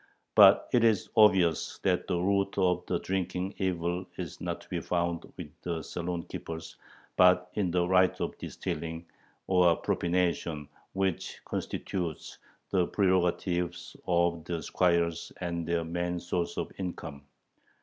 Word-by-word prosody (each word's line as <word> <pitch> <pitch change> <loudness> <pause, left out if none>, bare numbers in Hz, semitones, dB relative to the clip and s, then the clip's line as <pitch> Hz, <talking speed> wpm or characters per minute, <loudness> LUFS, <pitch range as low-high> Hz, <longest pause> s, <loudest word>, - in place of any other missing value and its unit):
But - - +7
it 120 - +4
is 110 -4 +2
obvious 95 -7 +4
that - - +1
the 90 - 0
root 100 +2 +1
of 90 -2 +2
the - - +1
drinking 95 0 -2
evil 90 -1 -1
is 85 -4 -6
not - - -3
to - - -17
be - - -2
found 85 -1 -2
with - - -7
the 85 -2 -3
saloon 85 +2 -4
keepers, 80 0 -7 0.4
but 90 0 +5
in 100 -4 0
the 90 0 +1
right 95 0 +3
of - - -2
distilling, 80 +2 -5 0.4
or 90 -3 +4
"propination," 85 -4 0 0.3
which 95 -2 -2
constitutes 85 -5 -4 0.3
the 90 -3 +2
prerogative 90 -2 +1 0.3
of 85 -2 +2
the 85 -1 -3
squires 85 -2 +1
and 85 -2 -3
their 85 -1 0
main 85 +1 -2
source 85 0 -2
of - - -3
income. 85 -6 -5
90 Hz, 140 wpm, -29 LUFS, 85-95 Hz, 0.4 s, But